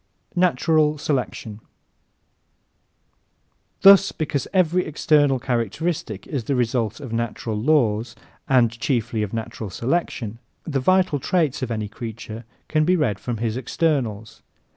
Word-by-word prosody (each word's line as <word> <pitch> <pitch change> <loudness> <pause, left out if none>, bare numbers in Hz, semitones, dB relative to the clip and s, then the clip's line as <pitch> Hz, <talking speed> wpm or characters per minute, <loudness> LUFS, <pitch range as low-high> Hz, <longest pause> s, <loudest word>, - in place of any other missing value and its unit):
Natural 160 -4 +2
Selection 130 -7 -3
¶ - - -17 2.2
Thus, 195 0 +8
because 145 -3 -2
every 180 -1 +2
external 145 -3 +2
characteristic 120 - -2
is 135 -7 -4
the 140 - 0
result 120 -2 0
of 130 -6 -7
natural 115 -1 -2
laws, 115 -3 +1 0.3
and 125 -4 +4
chiefly 120 -4 -1
of 105 -2 -2
natural 115 -2 -5
selection, 115 - -2 0.2
the 140 -4 -2
vital 185 +1 +2
traits 155 -2 0
of 130 - -2
any 110 -2 -2
creature 115 +1 -8 0.2
can 155 -1 +2
be 180 +4 +3
read 125 - 0
from 120 +2 -4
his 115 0 -2
externals. 125 -5 -2
125 Hz, 125 wpm, -23 LUFS, 115-155 Hz, 2.2 s, Thus